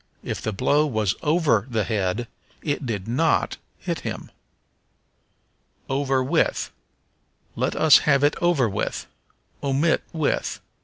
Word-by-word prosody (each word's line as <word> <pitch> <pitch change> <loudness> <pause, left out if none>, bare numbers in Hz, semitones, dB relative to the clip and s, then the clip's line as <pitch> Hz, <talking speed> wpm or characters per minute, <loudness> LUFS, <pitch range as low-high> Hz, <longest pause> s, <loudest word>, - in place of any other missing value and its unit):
If - - -4
the 110 - -2
blow 145 +8 +2
was 110 -7 0
over 150 - +2
the 110 -3 0
head 105 +2 -1 0.4
it 145 -3 -2
did 100 -4 -3
not 145 +7 +1 0.2
hit - - -3
him. - - -6 1.6
Over 135 -1 +1
with. 160 +5 +1 0.8
"Let - - -1
us 160 -2 +7
have 140 -2 +3
it 145 - +4
over 170 -8 +3
with." 100 - -3 0.6
Omit 140 +4 +2
with. 160 -4 -1
135 Hz, 120 wpm, -24 LUFS, 110-150 Hz, 1.6 s, us